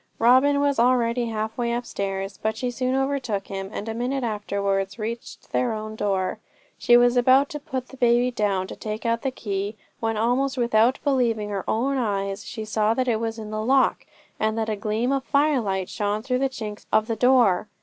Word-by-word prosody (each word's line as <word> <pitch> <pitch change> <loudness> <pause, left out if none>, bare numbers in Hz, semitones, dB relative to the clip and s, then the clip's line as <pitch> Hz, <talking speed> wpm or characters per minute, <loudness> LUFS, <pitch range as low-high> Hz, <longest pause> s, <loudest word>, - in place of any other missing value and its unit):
Robin 260 +5 +5
was 285 -3 +1
already 240 -1 +2
halfway 220 +2 -2
upstairs, 195 -5 -3
but 220 0 -1
she 250 0 -2
soon 255 +1 -1
overtook 265 -7 -1
him, 195 0 -5
and 210 - -5
a 225 - -2
minute 250 +3 -2
afterwards 200 -3 -1
reached 235 +3 -6
their 245 -3 +1
own 215 0 -5
door. 195 -3 -1 0.4
She 240 - +6
was 245 0 +4
about 260 +3 +5
to 295 - -5
put 260 -2 -5
the 265 - -12
baby 245 0 +3
down 200 -5 0
to - - -8
take 215 0 -6
out 230 0 +1
the 270 - 0
key, 205 -4 -4 0.2
when, 225 -1 -1
almost 255 +4 +1
without 235 +2 +3
believing 235 -7 +1
her 200 -2 -3
own 270 +5 +1
eyes, 195 -3 -2
she 220 -2 -6
saw 215 +1 +1
that 255 +1 0
it 225 -3 +1
was 225 0 -3
in 215 -1 -7
the 215 0 -2
lock, 265 +3 +2 0.3
and 220 +1 0
that 220 0 -1
a 215 - 0
gleam 215 +4 -1
of 275 -1 0
firelight 255 -11 +1
shone 210 +1 -2
through 250 0 0
the 270 0 +1
chinks 215 -5 -7
of 215 0 +3
the 225 - -2
door. 230 -5 +4
230 Hz, 200 wpm, -24 LUFS, 210-255 Hz, 0.4 s, She